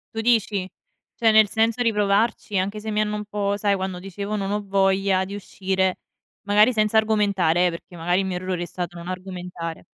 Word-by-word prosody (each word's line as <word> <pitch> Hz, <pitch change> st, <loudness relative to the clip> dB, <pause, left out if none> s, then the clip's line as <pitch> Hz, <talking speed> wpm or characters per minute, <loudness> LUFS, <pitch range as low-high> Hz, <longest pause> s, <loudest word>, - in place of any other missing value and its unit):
Tu -, -, -2 dB
dici? 210 Hz, -5 st, +1 dB, 0.5 s
Cioè 225 Hz, -1 st, +3 dB
nel 215 Hz, -1 st, +6 dB
senso 225 Hz, +3 st, +1 dB
di 230 Hz, -2 st, +2 dB
provarci 205 Hz, 0 st, +1 dB
anche 200 Hz, +3 st, -2 dB
se 220 Hz, 0 st, -4 dB
mi 210 Hz, -, 0 dB
hanno 210 Hz, 0 st, 0 dB
un 210 Hz, -, -4 dB
po' 205 Hz, -1 st, -1 dB
sai, 205 Hz, -1 st, +1 dB
quando 190 Hz, -1 st, -3 dB
dicevo: 200 Hz, +3 st, -5 dB
"Non 200 Hz, -1 st, -2 dB
ho 210 Hz, 0 st, -1 dB
voglia 195 Hz, -1 st, +2 dB
di 200 Hz, +2 st, -6 dB
uscire", 190 Hz, -1 st, -1 dB, 0.4 s
magari 210 Hz, +4 st, +4 dB
senza 215 Hz, 0 st, +2 dB
argomentare, 200 Hz, -6 st, +2 dB
eh, -, -, +2 dB
perché 170 Hz, +1 st, -9 dB
magari 175 Hz, +3 st, 0 dB
il 195 Hz, -, 0 dB
mio 185 Hz, -1 st, -3 dB
errore 180 Hz, -1 st, -3 dB
è -, -, -3 dB
stato 175 Hz, +1 st, -6 dB
non 170 Hz, +1 st, -9 dB
argomentare. 180 Hz, -3 st, -6 dB
200 Hz, 205 wpm, -23 LUFS, 185-210 Hz, 0.5 s, nel